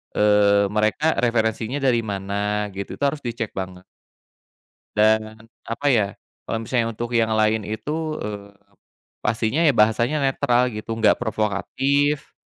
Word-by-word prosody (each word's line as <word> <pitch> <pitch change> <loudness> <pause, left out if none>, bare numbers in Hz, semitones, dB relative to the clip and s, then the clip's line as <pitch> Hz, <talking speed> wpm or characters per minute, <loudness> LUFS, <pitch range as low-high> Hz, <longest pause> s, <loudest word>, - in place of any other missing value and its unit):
eee, 100 -1 +4
mereka 110 +9 +1
referensinya 115 0 0
dari 125 -3 +3
mana, 100 +1 -2
gitu, 100 0 -6
itu - - -6
harus 140 +1 +1
dicek 115 -2 -4
banget. 95 -1 -6 1.1
Dan 110 +1 +2 0.2
apa, 115 +5 -3
ya, 110 -5 +3 0.4
kalau 115 0 -2
misalnya 115 0 0
untuk 120 +2 -5
yang 115 -2 +2
lain 110 0 +2
itu, 155 +8 -3
eee, 100 -1 -6 0.7
pastinya, 110 +6 0
ya, 145 - +5
bahasanya 115 +7 +3
netral, 125 -2 +2
gitu, 110 +1 -5
nggak 110 -1 +3
provokatif, 135 +8 0
110 Hz, 130 wpm, -22 LUFS, 105-120 Hz, 1.1 s, ya